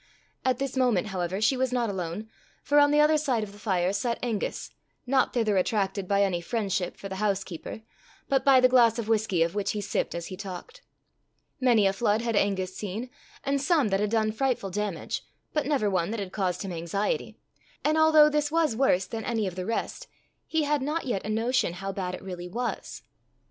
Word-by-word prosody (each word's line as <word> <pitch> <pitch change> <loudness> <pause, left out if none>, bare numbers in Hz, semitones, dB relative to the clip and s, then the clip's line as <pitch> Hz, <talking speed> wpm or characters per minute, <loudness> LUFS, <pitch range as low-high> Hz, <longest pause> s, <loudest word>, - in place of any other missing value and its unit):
At 255 -2 +2
this 275 0 -3
moment, 235 -6 +2
however, 185 0 -2
she 220 +5 +3
was 260 0 0
not 245 -2 +1
alone, 190 +1 -4 0.4
for 290 0 +4
on 290 0 +6
the 295 +1 +3
other 305 +1 +5
side 255 -7 0
of 205 - -7
the 205 - -15
fire 190 -3 0
sat 235 +4 -1
Angus, 225 -5 -3 0.3
not 260 0 +2
thither 215 -5 +1
attracted 195 0 0
by 200 +1 +3
any 180 -3 0
friendship 195 -2 -2
for 195 - -7
the 190 -1 -6
housekeeper, 195 -1 -3 0.5
but 270 -1 +2
by 270 -2 +6
the 255 - +6
glass 240 -3 +5
of 230 -2 -3
whisky 215 -6 +2
of 170 +1 -2
which 205 -1 -1
he 210 - -2
sipped 200 - -2
as 170 -1 -4
he 185 - -6
talked. 185 -2 -8 0.8
Many 240 -5 +4
a 195 - +3
flood 215 +2 +1
had 230 -2 -1
Angus 190 -2 0
seen, 215 +5 -5 0.3
and 275 0 0
some 285 -5 +2
that 195 0 +1
had 210 0 0
done 220 -1 +1
frightful 235 -4 -1
damage, 205 -3 -3 0.3
but 300 -3 0
never 280 -8 +1
one 185 -3 0
that 225 +1 -3
had 195 -2 -5
caused 185 -2 -1
him 195 - -5
anxiety; 175 - -2 0.5
and 305 +1 +3
although 315 -1 +7
this 295 -1 0
was 320 -7 +2
worse 210 -7 +3
than 225 +3 -5
any 225 -3 -1
of 185 - -3
the 185 +1 -4
rest, 230 - -3 0.4
he 320 -1 +1
had 295 -1 +1
not 300 +4 -2
yet 230 -7 -2
a 210 - -5
notion 225 -3 +1
how 195 +2 -4
bad 185 -2 -3
it - - -11
really 180 -2 -6
was. 240 +6 -4
215 Hz, 210 wpm, -27 LUFS, 190-255 Hz, 0.8 s, although